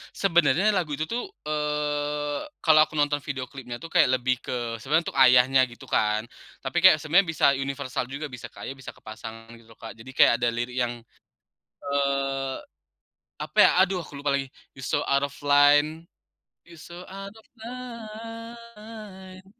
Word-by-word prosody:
Sebenarnya 175 0 +3
lagu 180 -7 0
itu 155 +2 -3
tuh, 240 +1 -2 0.2
eee, 150 -1 -2 0.2
kalau 155 -2 +5
aku 155 - -19
nonton 145 -1 +1
video 130 -3 -4
klipnya 125 -3 -8
tuh 165 - -8
kayak 130 - +4
lebih 130 0 +1
ke 120 -2 -3
sebenarnya 150 +8 0
untuk - - -9
ayahnya 125 +1 +5
gitu 120 -1 -14
kan. 105 0 +1 0.4
Tapi - - -4
kayak 155 -5 +7
sebenarnya 175 +4 +3
bisa - - +2
universal 135 -2 -3
juga, 140 +4 -6
bisa 125 -3 -9
kayak, 135 - -8
bisa 135 - -9
ke - - -23
pasangan 110 +1 -10
gitu 115 -1 -18
loh - - -32
Kak, 115 0 -9
jadi 115 +3 -12
kayak 125 - +6
ada 120 - 0
lirik 120 +2 -4
yang, 120 -1 -1 0.8
eee, 140 -1 -1 0.9
apa - - -7
ya, - - +8
aduh 190 -2 +2
aku 140 -2 -10
lupa 140 -1 +1
lagi. 135 -1 -5 0.2
"You're 130 - -8
so - - +2
out 140 0 +2
of 140 - -4
line, 145 +3 +4 0.6
you're 170 -2 -14
so 175 +1 -10
out 195 +1 -8
of 220 - -18 0.2
line, 225 -4 -10
145 Hz, 170 wpm, -25 LUFS, 130-175 Hz, 0.9 s, ya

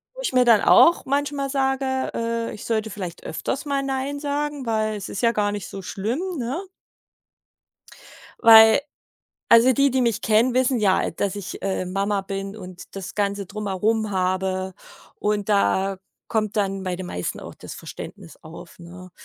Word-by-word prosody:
wo - - -7
ich - - -2
mir 250 -1 +4
dann 230 -3 +6
auch 340 - +6
manchmal 280 0 -1
sage: 265 -1 0
„Äh, 230 0 -2
ich 210 - -9
sollte 220 -1 -1
vielleicht 180 -5 -7
öfters 270 - -4
mal 280 -1 -1
Nein 270 +1 -3
sagen, 290 -1 -3
weil 215 -1 0
es 200 - -6
ist - - -4
ja 230 -1 +4
gar 205 -2 0
nicht 205 -3 -5
so 195 - -8
schlimm, 210 - -3 0.2
ne?“ 260 +9 -3 1.8
Weil 225 +2 +8 0.7
also, 230 +3 +7
die, 275 +2 +3
die 260 - +1
mich 230 -4 0
kennen, 230 +3 +3
wissen 255 -1 +2
ja, 195 -3 +2
dass 200 -1 -2
ich, 200 -2 -7
äh, 190 -1 -1
Mama 195 +2 -1
bin 195 +1 -5
und 180 -3 -11
das 195 -2 -7
ganze 200 -1 -1
Drumherum 210 +2 -1
habe 185 0 -1 0.4
und 210 0 -1
da 195 -1 +2 0.3
kommt 215 -2 -1
dann 195 -2 -1
bei 185 - -2
den 180 0 -6
meisten 90 - -4
auch - - -9
das - - -9
Verständnis 85 - -10
auf, 165 +1 -12
ne? 180 +1 -12
215 Hz, 170 wpm, -23 LUFS, 195-255 Hz, 1.8 s, Weil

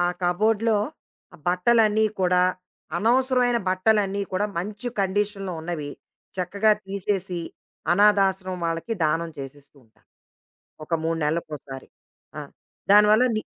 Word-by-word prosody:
ఆ - - +2 0.2
కబోర్డ్‌లో 215 +5 +2 0.6
ఆ - - -11
బట్టలన్నీ 215 +3 +3
కూడా 180 0 +3 0.6
అనవసరమైన 250 +1 +2
బట్టలన్నీ 200 +1 +1
కూడా 205 +3 0
మంచి 210 +6 -4
కండిషన్‌లో 195 0 -1
ఉన్నవి, 160 -3 -5 0.5
చక్కగా 200 +4 +2
తీసేసి, 195 -2 -2 0.5
అనాధాశ్రమం 190 -2 +2
వాళ్ళకి 165 +7 -3
దానం 165 +2 0
చేసేస్తూ 140 +1 -10
ఉంటాను. 110 - -33 0.8
ఒక 165 - -1
3 165 0 0
నెలలకోసారి. 150 -4 -4 0.5
ఆ! - - -3 0.5
దానివల్ల 210 +3 +6
ని 215 - -1
195 Hz, 105 wpm, -24 LUFS, 175-215 Hz, 0.8 s, దానివల్ల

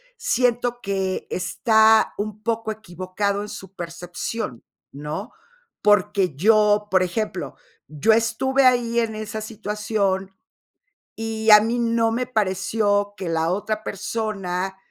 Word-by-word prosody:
siento 245 - 0
que 195 -1 -2
está 220 +4 +3
un 210 0 -4
poco 225 0 -2
equivocado 200 0 -3
en 210 - -6
su 190 0 -10
percepción, 175 - -5 0.3
¿no? 150 - -6 0.5
Porque 200 -5 +2
yo, 210 +4 +4
por 185 -1 +3
ejemplo, 180 - -3 0.3
yo 155 +9 +2
estuve 240 +4 +2
ahí 240 -2 +3
en 225 -2 -1
esa 215 0 -5
situación, 210 -3 -2 0.9
y 225 0 -1
a 210 0 +10
mí 230 +3 -1
no 230 -1 +1
me 250 +2 -1
pareció 205 -1 0
que 185 -4 -5
la 165 0 0
otra 210 +3 -2
persona, 195 -3 -3
210 Hz, 120 wpm, -23 LUFS, 190-225 Hz, 0.9 s, a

